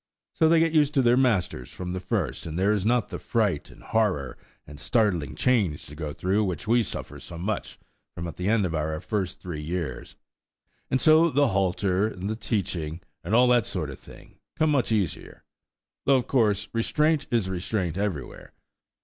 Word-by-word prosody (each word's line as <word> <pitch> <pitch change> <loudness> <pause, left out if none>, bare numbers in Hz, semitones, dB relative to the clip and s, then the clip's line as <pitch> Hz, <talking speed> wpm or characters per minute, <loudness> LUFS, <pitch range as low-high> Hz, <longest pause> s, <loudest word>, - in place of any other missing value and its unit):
So 160 - +3
they 165 0 +5
get 165 0 +3
used 150 -1 +3
to 135 - +4
their 120 0 +5
masters 100 - +1
from 90 -1 -5
the 95 - -3
first, 90 - -2
and 80 0 -5
there 100 +3 +3
is 105 -1 0
not 120 -1 +2
the - - -5
fright - - 0
and - - -16
horror 95 - 0 0.3
and 75 -1 -11
startling 100 - 0
change 105 -12 +1
to 75 - -11
go 75 -1 -4
through 95 +6 0
which 90 -5 -3
we 120 +2 +4
suffer 110 - -6
so 85 - -9
much 100 +5 -3 0.4
from 85 0 -4
at 85 - -7
the 90 +2 -1
end 110 -3 +3
of 85 - -2
our 80 0 -1
first 95 -1 -3
three 85 -5 -5
years; 80 -5 -4 0.7
and 130 - +2
so 160 +3 +6
the 145 -2 +3
halter, 95 0 +1
and 110 +2 -5
teaching, 85 -7 -2 0.2
and 100 +6 0
all 125 +1 +6
that 120 -2 +3
sort 90 -11 -3
of 65 - -10
thing, - - -16 0.2
come 155 -1 +3
much 130 -6 +1
easier–though, 110 - -3
of 125 - +1
course, 105 -6 +2
restraint 150 +6 +1
is 115 -6 +1
restraint 95 -2 -2
everywhere. 95 -8 -4
100 Hz, 185 wpm, -26 LUFS, 85-120 Hz, 0.7 s, so